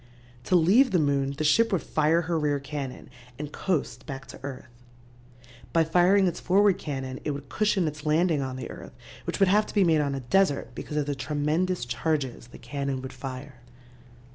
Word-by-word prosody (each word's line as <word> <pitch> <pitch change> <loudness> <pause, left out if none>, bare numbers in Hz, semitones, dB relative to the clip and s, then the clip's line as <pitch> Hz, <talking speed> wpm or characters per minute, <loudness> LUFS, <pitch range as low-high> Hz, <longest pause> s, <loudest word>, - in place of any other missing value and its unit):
"To 185 - +2
leave 200 +11 +5
the 190 - +2
moon 140 -3 +1
the 155 - -1
ship 225 +10 +4
would 190 - 0
fire 155 +2 +2
her 165 0 -1
rear 145 -2 +1
cannon 140 -2 -6 0.3
and 150 0 -6
coast 140 -9 -2
back 135 0 -6
to - - -10
earth. 135 -1 -7 1.1
By 165 -1 +4
firing 180 +4 +4
its 175 -2 -1
forward 195 +1 +3
cannon 135 -3 -5
it - - -2
would 140 -1 -5
cushion 205 -5 +1
its 150 0 -5
landing 160 0 +2
on 130 -1 -4
the 130 -2 -6
earth, - - -10 0.3
which - - -3
would 195 -2 +5
have 210 +2 +3
to - - -10
be 200 - +5
made 160 -3 +3
on 140 -1 -1
a - - -3
desert, 140 -1 +1
because 150 - -6
of 150 - +1
the 145 - -1
tremendous 150 +5 -1
charges 130 -1 -2
the 120 - -13
cannon 140 +1 -4
would 130 - -7
fire." 130 -1 -8
150 Hz, 195 wpm, -27 LUFS, 135-175 Hz, 1.1 s, leave